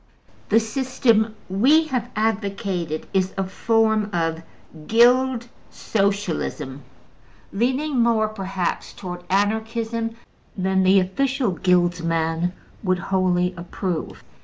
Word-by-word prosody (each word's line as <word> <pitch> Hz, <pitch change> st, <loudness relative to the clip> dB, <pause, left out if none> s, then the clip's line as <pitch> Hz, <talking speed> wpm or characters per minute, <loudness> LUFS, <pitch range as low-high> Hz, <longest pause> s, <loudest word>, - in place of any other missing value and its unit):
The 225 Hz, -, +5 dB
system 230 Hz, -2 st, +1 dB
we 260 Hz, -, +4 dB
have 245 Hz, -3 st, -2 dB
advocated 200 Hz, -6 st, -2 dB
is 190 Hz, -1 st, 0 dB
a 195 Hz, -, +1 dB
form 220 Hz, +2 st, +1 dB
of 165 Hz, -2 st, -1 dB, 0.5 s
Guild 245 Hz, +1 st, +4 dB, 0.2 s
Socialism, 195 Hz, -9 st, -2 dB, 0.7 s
leaning 260 Hz, +6 st, 0 dB
more, 230 Hz, -2 st, +3 dB
perhaps, 195 Hz, -4 st, -3 dB
towards 180 Hz, -2 st, -7 dB
Anarchism 225 Hz, +3 st, -1 dB, 0.4 s
than 190 Hz, 0 st, +1 dB
the 190 Hz, +1 st, +5 dB
official 255 Hz, +5 st, 0 dB
Guildsman 175 Hz, -1 st, +1 dB, 0.3 s
would 185 Hz, -2 st, +1 dB
wholly 180 Hz, -1 st, +1 dB
approve. 175 Hz, 0 st, -4 dB
200 Hz, 95 wpm, -23 LUFS, 180-230 Hz, 0.7 s, The